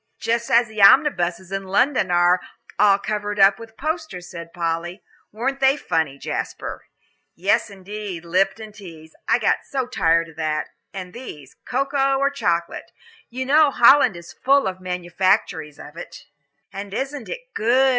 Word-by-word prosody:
"Just 235 +1 -1
as 235 +1 +4
the 215 -1 -5
omnibuses 190 - +4
in 195 0 -3
London 245 +2 +1
are 175 +1 +4 0.4
all 200 -1 +5
covered 205 0 -4
over 195 0 +6
with 225 -1 -12
posters," 310 - -4
said 170 -2 -9
Polly; 170 +2 -3 0.3
"weren't 265 +6 -3
they 270 +1 +4
funny, 160 - -1
Jasper?" - - -5 0.5
"Yes, 200 +6 +1
indeed, 195 -2 -7
'Lipton 195 +5 0
Teas,' 165 -6 -13
I - - +4
got - - +2
so 265 -2 -1
tired 165 -7 +1
of 160 - -17
that. 155 -1 -2 0.2
And 185 -2 -8
these, 150 - -10
cocoa 275 +1 +1
or 275 +1 +1
chocolate. 170 -11 -2 0.4
You 255 +2 -4
know 295 +2 +5
Holland 250 -5 +5
is 170 0 -12
full 275 +2 +2
of 185 -1 -4
manufactories 180 -3 -1
of - - -12
it." - - -10 0.5
"And 200 +1 -7
isn't 275 -2 -4
it - - -5
good?" 255 +4 +3
200 Hz, 155 wpm, -22 LUFS, 175-255 Hz, 0.5 s, over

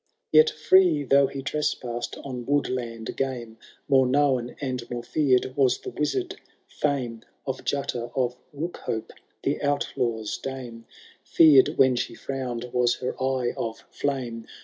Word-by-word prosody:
Yet 155 0 +7
free 155 0 +4
though 140 +1 +4
he 135 0 -6
trespassed 125 -5 -2
on 125 -3 -6
woodland 125 -5 -1
game, 120 -4 -3 0.3
More 135 -2 +4
known 130 -3 +1
and 125 -3 -4
more 120 -1 -4
feared 130 -2 +2
was 135 -3 +3
the - - -7
wizard 365 - -2 0.3
feme 125 -6 -2 0.2
Of 130 -1 -4
Jutta 120 -4 -2
of 125 -2 0 0.2
Bookhope, 140 -7 -4 0.3
the 140 - +1
Outlaw^s 125 -6 -1
dame; 120 -4 -7 0.4
Feared 150 -5 +6
when 130 -1 +5
she - - -3
frowned 130 -3 -4
was 125 -1 +3
her 125 - -3
eye 130 -2 0
of 115 -1 -5
flame. 125 -5 -3
130 Hz, 135 wpm, -26 LUFS, 120-140 Hz, 0.4 s, Yet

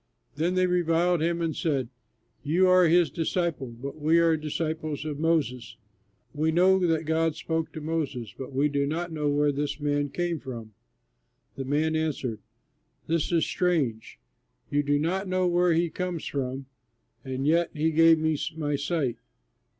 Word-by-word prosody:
Then 170 +5 0
they 185 0 +3
reviled 175 -1 +2
him 170 +1 0
and 160 -2 -1
said, 140 -7 -1 0.6
"You 170 +6 +3
are 185 -1 +6
his 170 +1 +4
disciple, 165 -4 -1
but 130 +6 -8
we 160 +3 +4
are 165 -1 +4
disciples 155 -1 -3
of 150 -2 -4
Moses. 155 -7 0 0.6
We 155 +2 +1
know 185 +3 +4
that 165 -3 +1
God 160 0 +1
spoke 160 0 -2
to 155 - -6
Moses, 145 -9 -3
but 135 +1 -7
we 135 +2 +2
do 140 -1 0
not 170 +3 -3
know 150 -2 -1
where 145 0 +2
this 145 +1 -3
man 145 -1 0
came 175 +1 -2
from." 115 -5 -8 0.8
The 135 - -5
man 155 +4 +1
answered, 140 -8 -2 0.7
"This 165 0 0
is 165 -2 +2
strange! 150 -12 -1 0.5
You 145 - +2
do 145 0 +1
not 185 +6 -1
know 185 0 +1
where 175 0 +3
he 165 0 +1
comes 180 -1 -4
from, 135 -1 -3 0.6
and 130 0 -3
yet 170 +3 +3
he 160 +1 0
gave 165 +1 +6
me 160 0 +1 0.2
my 145 -2 -1
sight! 140 -4 -1
155 Hz, 165 wpm, -27 LUFS, 145-170 Hz, 0.8 s, are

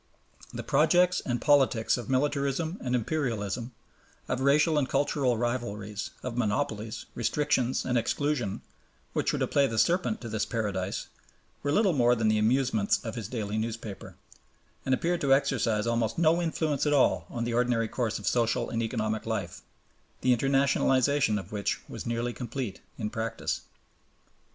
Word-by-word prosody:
The - - -5
projects 180 0 +3
and 120 -2 -1
politics 135 -5 +3
of 120 - -6
militarism 145 +5 0
and 125 -1 -1
imperialism, 120 -3 -2 0.6
of 130 - -2
racial 150 +3 +4
and 130 - -1
cultural 135 -3 +1
rivalries, 110 -4 -3
of 125 -2 -4
monopolies, 110 0 -2
restrictions, 130 +1 0
and 125 -1 +2
exclusion, 130 -4 -1 0.5
which - - +1
were - - -1
to - - +1
play 140 -1 +2
the 115 - -4
serpent 180 - +2
to 120 - -6
this 110 -2 -1
paradise, 100 -4 -2 0.6
were 145 - -1
little 200 +2 +3
more 120 -3 +4
than 110 -2 +1
the 110 0 +2
amusements 115 -2 +2
of 110 - -3
his 115 -5 -5
daily 110 -3 -3
newspaper, 110 -2 -5 0.7
and 130 - +4
appeared 175 +4 -1
to 135 -3 +5
exercise 120 -6 0
almost 115 -1 0
no 165 +1 +3
influence 155 -3 0
at 145 - +3
all 140 - +3
on 120 - -3
the 120 0 -2
ordinary 120 -1 +1
course 115 -1 -2
of 105 - -8
social 115 +3 +1
and 115 - -1
economic 110 -1 -2
life, 100 -6 -3 0.6
the 125 -1 +4
internationalization 135 -2 +2
of 95 0 -10
which 105 -1 -1
was - - -7
nearly 120 +1 -1
complete 120 -3 -5 0.2
in 105 -2 -3
practice. 115 -1 -3
120 Hz, 155 wpm, -28 LUFS, 110-140 Hz, 0.7 s, to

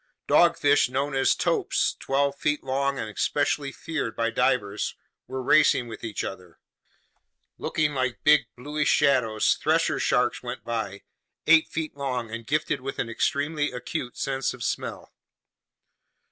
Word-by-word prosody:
Dogfish 160 -6 +4
known 135 +3 -1
as 135 0 +3
topes, - - 0
twelve 140 +1 0
feet 150 +1 -1
long 140 +1 -1
and - - -3
especially 140 +5 -1
feared 150 -6 -4
by 115 0 0
divers, 125 -6 0 0.3
were 130 0 -4
racing 130 -3 +4
with 115 - -9
each 110 -3 -3
other. 90 -3 -8 1.0
Looking 150 -1 0
like 130 -3 -2
big 150 -1 +5
bluish 145 +4 -1
shadows, 115 -6 +3
thresher - - +1
sharks - - +1
went - - -6
by, 110 -4 -4 0.4
eight 160 0 +6
feet 160 -2 -4
long 125 -5 -3
and 115 0 -7
gifted 150 0 0
with 135 +1 -5
an 115 - -2
extremely 145 +5 0
acute 125 +1 -5
sense 135 -1 -1
of 120 - -8
smell. - - -4
135 Hz, 140 wpm, -26 LUFS, 120-145 Hz, 1.0 s, eight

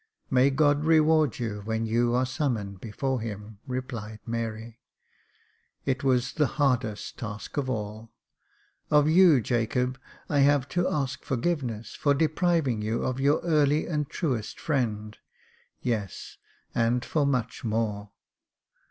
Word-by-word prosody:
" - - -47
May 130 +1 +5
God 145 +1 +3
reward 155 -3 +4
you, 105 -4 -3
when 110 +1 -1
you 120 +2 +2
are 130 +1 +2
summoned 115 - -2
before 130 +3 -2
Him," 105 -1 -7
replied 120 -4 -5
Mary. 115 0 -4 0.5
" - - -40
It 135 +1 -1
was 130 -2 +2
the 150 -3 +2
hardest 125 -7 0
task 105 -1 -6
of 140 -3 -1
all. 110 -1 -4 0.8
Of 150 0 +5
you, 165 -4 +6
Jacob, 125 +2 0 0.3
I 145 - +1
have 140 -1 +4
to 175 +3 +1
ask 140 -3 -2
forgiveness 125 -6 -2
for 145 -1 +2
depriving 155 - +1
you 110 +2 -1
of 130 0 -2
your 140 +2 +3
early 150 -3 +2
and 150 -4 -2
truest 130 - -2
friend 110 -8 -1 0.4
— - - -36
yes, 110 -7 -3 0.4
and 120 +1 +1
for 155 - +1
much 125 -4 -1
more. 105 -2 -1
125 Hz, 140 wpm, -27 LUFS, 110-145 Hz, 0.8 s, you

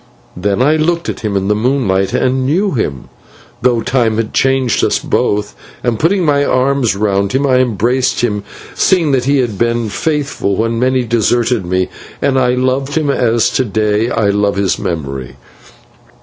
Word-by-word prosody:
Then 100 +6 0
I 150 +3 +3
looked 170 +2 0
at - - -4
him 105 -3 -2
in 95 0 -2
the 105 - +3
moonlight 105 -5 0
and 130 +1 0
knew 180 +9 +1
him, 75 - -2 0.6
though 120 -2 +2
time 115 -3 0
had 115 -1 -2
changed 135 -2 +1
us - - +2
both, 105 0 -1 0.3
and, 120 -3 -1
putting 180 +2 +2
my 145 -2 +2
arms 130 -4 +1
round 100 -1 0
him, 135 +2 +1
I 130 -2 +3
embraced 125 +2 +1
him, 105 -4 -1 0.3
seeing 170 -6 +2
that 130 -2 +1
he 140 +1 +2
had 120 -7 -1
been 115 -1 0
faithful 145 -4 -1
when 115 +2 -1
many 130 0 +1
deserted 115 -2 0
me, 95 0 0 0.3
and 135 -1 +1
I 125 -1 +2
loved 130 +2 -1
him 150 -3 +1
as 120 -4 +1
to 130 - +1
day 110 0 0
I 105 -4 +1
love 100 0 +1
his 100 -1 0
memory. 70 -6 -4
120 Hz, 175 wpm, -14 LUFS, 105-135 Hz, 0.6 s, I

